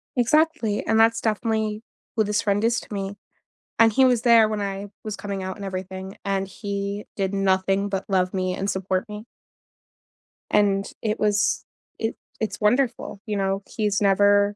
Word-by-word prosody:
Exactly, 255 -3 +2
and 220 - +2
that's 230 +1 +4
definitely 220 -1 -1 0.3
who 220 - +3
this 210 +1 0
friend 205 0 +1
is 235 +1 +2
to - - -11
me, 195 0 -3 0.6
and 225 -1 +6
he 265 - +5
was 245 -3 +3
there 230 -3 +6
when 215 -1 -2
I 200 0 -3 0.2
was 215 -1 -4
coming 200 -2 -4
out 190 0 -4
and 200 - -7
everything, 190 0 -6
and 195 -1 0
he 200 +1 -4
did 195 -1 -1
nothing 195 0 +1
but 195 -1 -2
love 185 -2 +1
me 185 -1 -1
and 195 +2 -3
support 190 +2 -1
me. 210 +1 -8 1.3
And 200 -1 +3
it 215 -1 -1
was 210 -1 +1 0.3
it 225 0 -1 0.2
it's 220 0 -3
wonderful, 230 -2 +1
you 210 -2 -2
know? 195 0 0
He's 210 -2 0
never, 205 +1 +4
205 Hz, 170 wpm, -24 LUFS, 195-220 Hz, 1.3 s, and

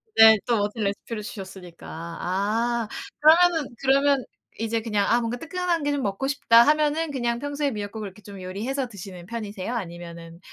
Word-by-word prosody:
네. 220 -1 +9
또 235 -2 +2
멋진 210 +2 -1
레시피를 205 +2 -3
주셨으니까. 190 -5 -9
아 200 +8 -2 0.3
그러면은 320 -4 +5
그러면 275 0 +3 0.3
이제 225 0 -1
그냥 210 -3 0
'아 235 - +4
뭔가 235 +1 -2
뜨끈한 345 +1 -2
게 290 - +1
좀 285 -1 -1
먹고 200 +6 -2
싶다.' 235 -4 +5
하면은 305 +1 +2
그냥 240 -3 -1
평소에 285 0 -2
미역국을 205 -2 -5
좀 200 -2 -9
요리해서 240 +9 -3
드시는 185 -4 -10
편이세요? 215 -1 -5
아니면은 170 -3 -7
230 Hz, 370 characters per minute, -25 LUFS, 200-275 Hz, 0.3 s, 네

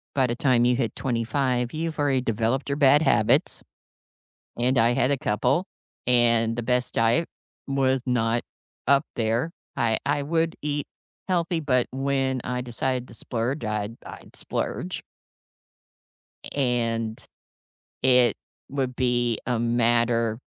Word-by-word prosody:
by 130 -2 +3
the 120 - -2
time 125 -2 +3
you 125 0 +3
hit 120 -3 -2
25, 125 +1 -1
you've 160 0 -3
already 135 -3 +2
developed 115 +4 -1
your 140 - 0
bad 145 +1 +5
habits, 110 -8 +2 1.0
and 125 +2 +1
I 115 +1 +4
had 135 +1 +2
a - - +2
couple, 130 - +1 0.4
and 115 -2 +3
the 120 - -2
best 125 0 0
diet 115 +9 +2 0.4
was 135 -1 +2
not 120 -1 +1 0.5
up 140 +1 +5
there. 115 +7 0 0.3
I 110 -1 +1
I 145 0 +1
would 165 +2 0
eat 145 -1 -2 0.4
healthy, 170 -2 0
but 125 -5 +1
when 135 -1 0
I 125 0 -2
decided 125 +1 -2
to 115 - -12
splurge, 120 +5 -3
I'd 105 +1 -3
I'd - - -11
splurge - - -4 1.5
and 115 -4 -1 0.8
it 125 -3 +4 0.3
would 130 -2 -2
be 120 -2 +1
a 125 -2 0
matter 115 -1 +2
125 Hz, 130 wpm, -25 LUFS, 115-135 Hz, 1.5 s, bad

